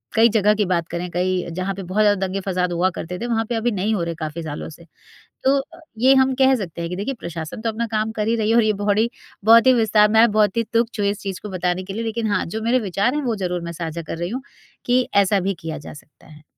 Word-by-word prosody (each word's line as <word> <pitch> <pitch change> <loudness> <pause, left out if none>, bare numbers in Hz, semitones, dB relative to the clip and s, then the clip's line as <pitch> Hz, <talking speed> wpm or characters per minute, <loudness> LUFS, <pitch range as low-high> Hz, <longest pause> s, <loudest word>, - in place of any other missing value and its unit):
कई 230 +1 +6
जगह 210 -1 +3
की 210 - +1
बात 170 -3 0
करें 175 +1 -4
कई 180 0 -1
जहाँ 190 +1 -1
पर 195 - -6
बहुत 185 +4 0
ज़्यादा 205 -2 +3
दंगे-फ़साद 185 -2 -2
हुआ 180 +2 +2
करते 180 +2 -5
थे 240 - -3
वहाँ 225 -1 0
पे 235 - -1
अभी 230 +2 0
नहीं 205 +2 -1
हो 175 - -1
रहे 170 0 -3
काफ़ी 160 +1 -5
सालों 150 0 -6
से। 165 +2 -14 0.6
तो 275 +1 +4
अ, 330 +5 -10 0.2
ये 260 +4 +5
हम 265 0 +2
कह 265 0 +4
सकते 170 -6 -5
हैं 170 - -3
कि 180 - -4
देखिए 205 +8 -3
प्रशासन 165 +4 -6
तो 225 - -1
अपना 230 +1 -2
काम 220 0 -1
कर 215 -1 -2
ही 230 - +2
रही 220 -1 0
है 230 - +3
और 235 - +5
ये 215 0 +2
बोहडी 210 +3 +2 0.4
बहुत 230 +3 +7
ही 260 - +7
विस्तार, 215 -2 +4
मैं 225 +1 +5
बहुत 210 0 +2
ही 230 - +3
तुच्छ 230 -1 0
हूँ 200 - +2
इस 200 0 -1
चीज़ 190 -2 -5
को 210 - -7
बताने 180 0 -1
के 195 +1 -7
लिए 225 - -3
लेकिन 225 0 -2
हाँ 195 - +1
जो 220 - -2
मेरे 245 +3 +2
विचार 200 +9 +1
हैं 300 - 0
वो 235 -3 0
ज़रूर 180 -3 -2
मैं 170 - -5
साझा 165 0 -5
कर 165 0 -6
रही 175 +1 -3
हूँ 255 +4 -4 0.4
कि 250 +1 +3
ऐसा 200 0 +4
भी 195 +2 -1
किया 160 -1 -5
जा 145 - -10
सकता 145 0 -17
है। 155 -1 -16
205 Hz, 280 wpm, -21 LUFS, 180-225 Hz, 0.6 s, बहुत